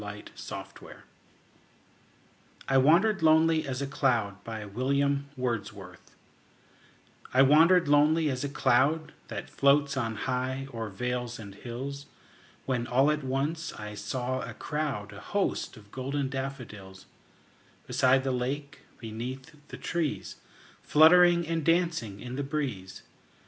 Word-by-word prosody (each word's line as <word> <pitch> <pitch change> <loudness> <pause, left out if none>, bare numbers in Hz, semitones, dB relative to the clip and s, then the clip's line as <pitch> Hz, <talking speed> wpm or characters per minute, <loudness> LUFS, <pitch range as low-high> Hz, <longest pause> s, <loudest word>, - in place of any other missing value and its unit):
William 105 0 -9
Wordsworth - - -9 1.6
I 135 0 +4
Wandered 190 +9 +4
Lonely 160 0 +4
As 130 +1 -3
a - - -1
Cloud 120 -8 0 2.9
I 130 - +6
WANDERED 165 +5 +5
lonely 150 +2 +4
as 130 0 -3
a 145 - -2
cloud 140 +4 +2 0.2
That - - -6
floats 140 0 +3
on 115 -4 -2
high 130 +3 -2
o'er 115 -2 -4
vales 125 +3 -3
and 100 -3 -9
hills, 135 +6 -7 0.6
When 125 -2 -1
all 135 +4 +3
at 150 -1 -2
once 145 +5 -2
I 105 0 -7
saw 130 +4 -3
a - - -7
crowd, 135 -10 -3
A 100 - -10
host, 200 -9 -2
of 105 -1 -17
golden 135 +1 -2
daffodils; 125 -8 -7 0.8
Beside 130 +1 +3
the 135 - 0
lake, 135 +3 -3 0.2
beneath 125 +6 -7
the - - -9
trees, 165 -4 -3 0.4
Fluttering 170 +2 +6
and 165 -1 -1
dancing 165 - 0
in 125 +2 -7
the 140 - -1
breeze. 130 -11 -4
135 Hz, 120 wpm, -28 LUFS, 120-150 Hz, 2.9 s, I